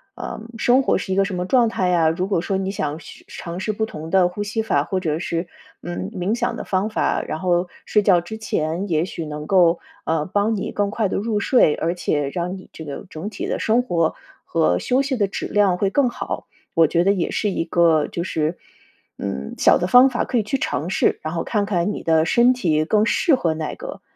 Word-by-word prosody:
呃， - - -6 0.2
生 245 +4 +4
活 - - +2
是 190 0 -3
一 - - 0
个 195 - +4
什 195 -1 -3
么 180 0 -2
状 235 +3 +3
态 185 -5 -1
呀， 170 -3 +3
如 180 +4 -1
果 195 -4 0
说 190 +2 -1
你 190 0 -2
想 155 -5 -3
是 - - -13
尝 170 +1 -7
试 215 - -1
不 220 +1 -1
同 160 -6 -8
的 185 0 +4
呼 205 +4 -4
吸 210 +2 -2
法， 145 -10 +1
或 185 +4 -2
者 160 -3 -1
是， 170 0 -3 0.3
嗯， 90 +2 -5
冥 185 +5 -1
想 - - -1
的 - - -5
方 190 +2 0
法， 215 - 0
然 155 - -5
后 175 0 +1 0.2
睡 210 - +3
觉 190 -3 +4
之 175 +6 -7
前 175 -2 -2
也 160 0 +1
许 170 -3 -6
能 150 0 -6
够， 175 -2 +4 0.3
呃， 160 -2 0
帮 205 +4 0
你 195 - -3
更 205 -1 0
快 215 0 0
地 - - -2
入 215 +1 -1
睡， 205 - +4
而 170 +2 -1
且 145 -5 -1
让 180 +2 -3
你 185 - -14
这 160 - -8
个 145 -2 -7
整 160 +7 -6
体 - - -5
的 - - -2
生 230 +3 +2
活 170 -9 0 0.3
和 160 - +2
休 255 +2 +1
息 275 -1 -1
的 205 -5 +1
质 195 - -5
量 200 -3 +2
会 195 +1 +1
更 265 +4 +2
好， - - -5 0.3
我 165 -1 +5
觉 170 +2 +2
得 200 - +4
也 180 -4 -1
是 210 - 0
一 180 - -1
个 165 -2 +3
就 170 - -4
是， 160 -1 -1 0.6
嗯， 65 +1 -4
小 - - +5
的 180 - -1
方 250 +6 +7
法 245 - -1
可 245 - -1
以 220 - +2
去 215 +7 -1
尝 170 - -2
试， 185 - +1
然 155 - -3
后 165 - -2
看 210 -3 0
看 190 -1 0
你 - - -6
的 160 -1 +3
身 240 +7 +4
体 160 -11 +1
更 215 +5 +2
适 280 +7 +3
合 170 -10 0
哪 155 -1 -4
个？ - - -8
185 Hz, 260 characters per minute, -21 LUFS, 165-210 Hz, 0.6 s, 方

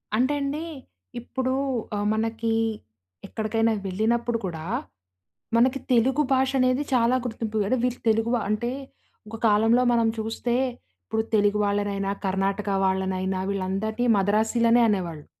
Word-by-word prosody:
అంటే 255 +5 +2
అండి, 290 +3 -2 0.6
ఇప్పుడు 260 +2 -2 0.4
ఆహ్, 205 0 -1
మనకి 225 +1 -1 0.8
ఎక్కడికైనా 225 +1 0
వెళ్ళినప్పుడు 230 +4 0
కూడా, 160 -3 -5 0.9
మనకి 260 +3 +3
తెలుగు 265 +5 +3
భాష 265 0 +2
అనేది 255 +2 +2
చాలా 240 +1 +3
గుర్తింపు. 220 -2 -3
అరె! 255 - +1
వీరు 250 0 -2
తెలుగు 225 +2 +1
వా 230 - 0
అంటే, 235 +3 -1 0.6
ఒక 225 - -7
కాలంలో 225 +4 +4
మనం 230 -1 +3
చూస్తే, 225 +2 -2 0.5
ఇప్పుడు 220 - -1
తెలుగు 205 0 +3
వాళ్ళనైనా, 200 -1 -1 0.2
కర్ణాటక 195 +2 -1 0.2
వాళ్ళనైనా, 190 0 -1
వీళ్ళందరినీ 200 +5 -1
మద్రాసిలనే 225 +4 +3
అనేవాళ్ళు. 170 -7 -2
225 Hz, 120 wpm, -25 LUFS, 200-240 Hz, 0.9 s, కాలంలో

